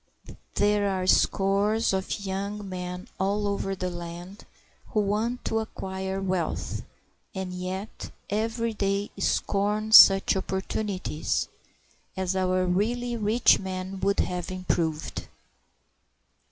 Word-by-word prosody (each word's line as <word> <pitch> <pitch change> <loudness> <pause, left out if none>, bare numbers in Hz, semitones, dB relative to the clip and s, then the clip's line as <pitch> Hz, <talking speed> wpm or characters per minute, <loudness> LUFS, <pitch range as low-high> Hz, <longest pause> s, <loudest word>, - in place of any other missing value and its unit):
There 205 0 +2
are 185 -1 -1
scores 200 +4 +2
of 190 +2 -2
young 200 +2 -3
men 180 -1 -5
all 200 +2 0
over 195 -1 -1
the 185 -1 -3
land 175 +3 -8 0.4
who 215 - 0
want 215 +4 -1
to 225 - +1
acquire 190 -3 -4
wealth, 185 -3 -2 0.5
and 190 -1 -4
yet 185 +3 -5 0.2
every 225 +2 -1
day 200 0 -1
scorn 210 +2 0
such 195 -3 +9
opportunities 190 -3 -2 0.7
as 190 0 -1
our 185 0 +1
really 235 +7 0
rich 220 +2 +4
men 190 0 -5
would 200 +1 +2
have 180 -1 -3
improved. 170 -4 -2
195 Hz, 110 wpm, -27 LUFS, 185-210 Hz, 0.7 s, such